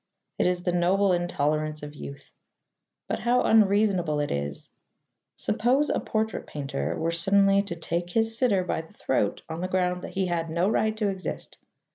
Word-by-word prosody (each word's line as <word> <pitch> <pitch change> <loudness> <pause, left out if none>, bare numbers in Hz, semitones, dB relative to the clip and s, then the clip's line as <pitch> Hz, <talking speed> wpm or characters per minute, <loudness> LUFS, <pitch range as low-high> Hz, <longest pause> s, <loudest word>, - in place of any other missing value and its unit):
It - - +3
is 180 -1 0
the 180 - +1
noble 185 +3 +3
intolerance 155 -3 -1
of 145 0 -7
youth; 140 -1 -10 0.8
but - - -2
how 245 +1 +2
unreasonable 200 -7 +3
it 145 - -1
is! 70 0 -3 0.7
Suppose 255 +7 +1
a - - +1
portrait 220 -1 -2
painter 140 -2 -3
were 165 +1 0
suddenly 195 +3 +3
to 200 -4 -5
take 170 +1 -3
his 225 +4 +1
sitter 225 -6 +2
by 175 - -2
the 160 - -18
throat 105 -6 -1
on 160 +1 -5
the 185 - -1
ground 180 -1 0
that - - -8
he 190 0 +1
had 170 -2 -1
no 170 +3 +1
right 220 0 +1
to 210 -2 +1
exist. 190 -1 -6
180 Hz, 175 wpm, -26 LUFS, 160-200 Hz, 0.8 s, It